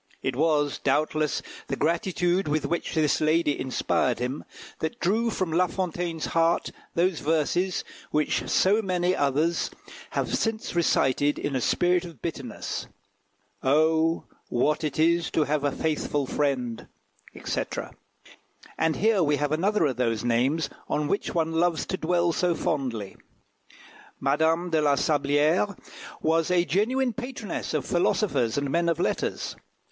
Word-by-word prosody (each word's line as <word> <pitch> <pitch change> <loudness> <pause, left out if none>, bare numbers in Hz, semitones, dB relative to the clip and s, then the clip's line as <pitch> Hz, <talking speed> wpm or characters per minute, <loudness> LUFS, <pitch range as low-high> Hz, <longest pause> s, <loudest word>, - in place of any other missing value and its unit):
It 135 - -1
was, 150 -1 +1
doubtless, 155 +1 0 0.2
the - - -2
gratitude 175 +2 0
with 150 +1 0
which 170 - -2
this 155 -2 +2
lady 155 -1 +2
inspired 130 -1 0
him, 125 +4 -3 0.3
that 160 - -3
drew 220 +6 +1
from 185 -6 -2
La 180 +3 +3
Fontaine's 175 -3 -3
heart 165 0 +2 0.2
those 175 -1 +2
verses, 165 +4 0 0.3
which 150 0 0
so 205 +4 +4
many 180 -2 +1
others 150 +4 +1 0.5
have - - 0
since 225 -1 -2
recited 145 -4 +2
in 145 - -2
a 130 - 0
spirit 180 +7 +2
of 170 -7 -10
bitterness - - -5 0.7
"Oh, 160 +4 +3 0.3
what 150 +6 +1
it 150 -3 -2
is 170 +1 +3
to 155 - +2
have 150 0 -1
a 145 - +2
faithful 150 -1 -1
friend," 130 -5 -1 0.6
&c. - - 0 1.2
And 160 0 +2
here 215 -1 +3
we 150 -2 +3
have 145 +1 -1
another 190 +4 +2
of 130 -5 -1
those 115 -3 0
names 130 +6 +1 0.2
on 150 0 0
which 200 - -2
one 165 -1 +1
loves 165 0 +1
to 190 - -3
dwell 170 0 +1
so 175 0 +1
fondly. 125 - -2 1.0
Madame 160 +5 +1
de 160 -1 +3
la 145 -1 +3
Sablière 150 +7 +2 0.5
was 165 +1 +2
a 175 -1 +3
genuine 245 +7 +1
patroness 245 - -5
of 150 - -1
philosophers 175 - +1
and 140 -1 -1
men 170 +2 +2
of 165 -1 0
letters. - - -1
160 Hz, 140 wpm, -26 LUFS, 145-175 Hz, 1.2 s, so